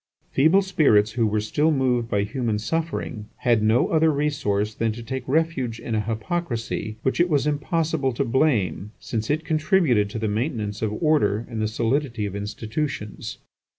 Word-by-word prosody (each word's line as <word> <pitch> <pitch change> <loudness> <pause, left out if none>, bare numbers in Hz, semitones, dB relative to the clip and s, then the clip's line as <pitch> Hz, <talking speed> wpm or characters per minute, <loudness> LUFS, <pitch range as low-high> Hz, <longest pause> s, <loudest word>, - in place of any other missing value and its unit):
Feeble 160 +8 +4
spirits 135 - +3
who 115 -1 +1
were 105 0 +1
still 145 +9 +1
moved 125 -5 +1
by 100 -2 +1
human 110 0 -1
suffering 130 -4 -3
had 120 -3 +2
no 110 +3 +3
other 160 0 +4
resource 110 -8 0
than 115 +1 0
to 120 +1 -8
take 130 +3 -4
refuge 135 -6 0
in 115 - -5
a 110 - +1
hypocrisy 115 - -3
which 130 - 0
it 175 +1 +4
was 145 -3 +2
impossible 150 -1 0
to 135 +4 -1
blame, 110 - +1
since 110 -2 -4
it 155 +2 0
contributed 155 - +2
to 105 - -5
the 110 0 -1
maintenance 105 -2 -2
of 110 -2 0
order 120 -8 +2
and 115 -2 -4
the 110 - +1
solidity 115 +1 -1
of 100 -1 -5
institutions. 105 +3 -4
120 Hz, 170 wpm, -24 LUFS, 110-150 Hz, -, Feeble